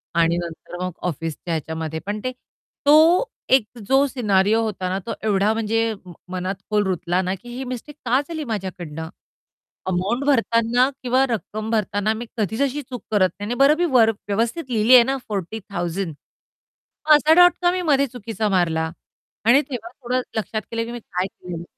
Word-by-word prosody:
आणि 170 0 +3
नंतर 170 0 -7
मग 185 - -2 0.2
ऑफिसच्या 165 +1 -4
ह्याच्यामध्ये 160 0 -3
पण 205 +1 -3
ते 255 - -1 0.5
तो 320 +9 +6 0.3
एक 265 -5 +5 0.2
जो 270 +1 +4
सिनारियो 215 -4 +2
होता 190 -4 -3
ना, 190 +1 -1
तो 225 +4 -5
एवढा 210 0 +2
म्हणजे 225 0 0
म 180 - -10 0.2
मनात 185 +1 -2
खोल 210 -1 +2
रुतला 180 0 0
ना 185 0 -1
की 240 - -12
ही 265 - -4
मिस्टेक 255 +3 -7
का 245 +2 +3
झाली 320 -2 -4
माझ्याकडनं? 180 - -5 0.8
अमाउंट 190 +8 0
भरताना 240 -2 +3
किंवा 255 +2 +3
रक्कम 215 -1 -3
भरताना 210 0 0
मी 230 +2 -6
कधीच 220 +3 -1
अशी 280 +1 0
चूक 250 -2 -6
करत 195 -3 +4
नाही 205 - -4
आणि 240 - -2
बरं 280 +2 +6
मी 350 - +2
वर 230 -3 +6 0.2
व्यवस्थित 230 +10 0
लिहिली 225 +1 +3
आहे 245 - +9
ना 270 +3 -1
40,000, 195 -3 -3 0.9
मग 305 - +9
असा 300 +1 +5
डॉट 355 - +6
का 350 0 +4
मी 365 0 -1
मध्ये 280 -4 +3
चुकीचा 225 -3 -3
मारला? 165 -4 +1 0.5
आणि 250 +5 +6
तेव्हा 235 -4 -5
थोडं 255 -1 -2 0.2
लक्षात 220 0 -2
केलं 230 0 -1
की 235 - -7
मी 240 - -5
काय 185 -3 -3
केलेलं. 175 -3 -8
220 Hz, 175 wpm, -22 LUFS, 185-250 Hz, 0.9 s, आहे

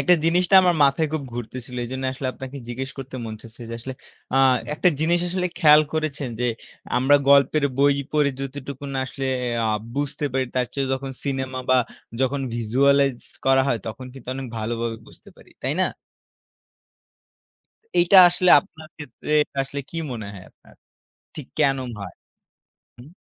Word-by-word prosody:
একটা 175 +6 +5
জিনিসটা 180 +3 +3
আমার 180 -1 +3
মাথায় 140 +3 +2
খুব 155 - -2
ঘুরতেছিল 125 +1 -7
এইজন্য 130 +2 -5
আসলে 135 0 -5
আপনাকে 135 +1 -8
জিজ্ঞেস 130 +2 -4
করতে 130 0 -7
মন 110 -1 -5
চাচ্ছে। 115 +1 -13
যে 115 - -5
আসলে 130 +3 -7 0.4
আ - - +3 0.4
একটা 180 - +3
জিনিস 170 +2 +2
আসলে 180 0 -1
খেয়াল 150 -3 +7
করেছেন 150 -4 -2
যে, - - +1 0.5
আমরা 135 +3 +5
গল্পের 140 +1 +5
বই 140 0 +4 0.2
পড়ে 150 -2 +3
যতটুকু 135 0 -6
না 135 - -1
আসলে 135 - -6 0.2
এ - - 0 0.2
আ - - +1 0.3
বুঝতে 145 +1 -3
পারি, 130 0 +1
তার 125 -1 +1
চেয়ে 140 -1 -1
যখন 135 0 -3
সিনেমা 130 -2 -3
বা 130 - +6 0.4
যখন 135 +1 +1
visualize 135 +3 +2 0.2
করা 135 0 +5
হয়, 120 - +1
তখন 125 +3 -6
কিন্তু 135 -2 -13
অনেক 135 -1 -5
ভালোভাবে 115 +1 -3
বুঝতে - - -17
পারি। - - -19
তাই - - 0
না? - - +3 2.1
এইটা 175 +3 +5
আসলে 175 +1 +2
আপনার 160 -6 -15
ক্ষেত্রে 150 0 -9
এটা 145 - -13
আসলে 140 +1 -5
কি 165 - -8 0.2
মনে 110 -3 -6
হয় 95 -2 -11
আপনার? - - -23 0.6
ঠিক 150 -5 -8
কেন 135 -2 +3 0.2
হয়? 95 -3 -8 0.8
হুম। 120 +4 -13
135 Hz, 165 wpm, -23 LUFS, 130-150 Hz, 2.1 s, খেয়াল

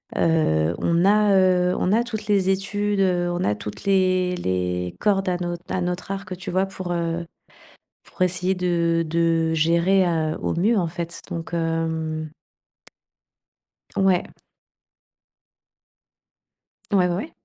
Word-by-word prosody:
heu, 85 - +2
on 170 +2 +1
a, 210 0 +4
heu 180 -1 +3
on 185 - 0
a 225 +3 +3
toutes 230 -3 -6
les 195 -2 +2
études, 205 +1 0
heu, 180 -2 +2
on 175 +1 -2
a 105 - +1
toutes 105 0 -8
les 185 -2 +2
les 90 - -2
cordes 195 -2 +1
à 180 - 0
notre 175 -1 -4
à 185 - 0
notre 180 +2 -3
arc 190 -2 -5
tu 190 - -6
vois, 185 +2 +2
pour, 185 -2 -6
heu 170 0 -2 0.8
pour - - -14
essayer 180 +1 +1
de 170 -2 +1
de 165 0 +1
gérer 170 +4 +3
à 160 -2 0
au - - -1
mieux, 205 +7 +2
heu, - - +1
en 175 - 0
fait, 170 0 -6
donc 165 0 -6
hem 160 -1 -2 1.7
Ouais. 190 -2 +2 2.6
Ouais, 190 -3 +4
ouais. 190 - -3
175 Hz, 140 wpm, -23 LUFS, 165-190 Hz, 2.6 s, a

